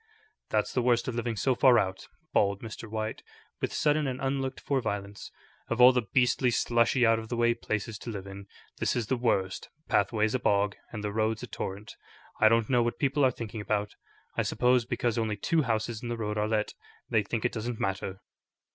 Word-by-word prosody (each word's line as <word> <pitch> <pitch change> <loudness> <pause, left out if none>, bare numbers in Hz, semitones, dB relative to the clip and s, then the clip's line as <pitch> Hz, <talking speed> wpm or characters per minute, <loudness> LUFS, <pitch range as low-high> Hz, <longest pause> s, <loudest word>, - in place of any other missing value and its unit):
"That's - - 0
the 125 - +1
worst 120 -1 +2
of 130 - -2
living 120 -1 -2
so 130 +6 +1
far 125 0 +5
out," 95 -3 -1 0.3
bawled 100 +1 +2
Mr. 115 0 -7
White, 110 0 -3 0.4
with - - -1
sudden 150 -1 +1
and 130 -1 -3
unlooked 135 0 -2
for 135 -2 0
violence; 100 -2 -4 0.4
"of 115 - -2
all 125 +1 +9
the 125 -4 -1
beastly, 125 0 +3
slushy, 120 +1 +2
out 115 0 +4
of 110 0 -9
the 120 - -2
way 120 0 +3
places 110 -2 -4
to - - -7
live 100 -4 -5
in, 100 0 -9 0.3
this - - +1
is 120 - 0
the 130 - 0
worst. 100 -6 -1 0.2
Pathway's 110 -1 +2
a 130 - +1
bog, 100 -2 +2 0.2
and 110 -3 -6
the 105 -1 -3
road's 110 +1 0
a - - -5
torrent. 100 0 -6 0.4
I 110 - +7
don't 115 -1 +3
know 125 -2 +3
what 120 0 -1
people 140 0 +1
are 130 - +6
thinking 115 -3 -6
about. 105 0 -1 0.4
I - - +1
suppose 125 -1 +2
because 120 -1 -1
only 110 -2 -1
two 165 - +1
houses 115 -3 -1
in 120 - -5
the 120 - -2
road 105 -2 -2
are 105 0 0
let, 110 -1 0 0.3
they 110 - +2
think 110 +2 -3
it - - +2
doesn't 115 +1 -4
matter." 95 0 -3
115 Hz, 210 wpm, -29 LUFS, 105-125 Hz, 0.4 s, all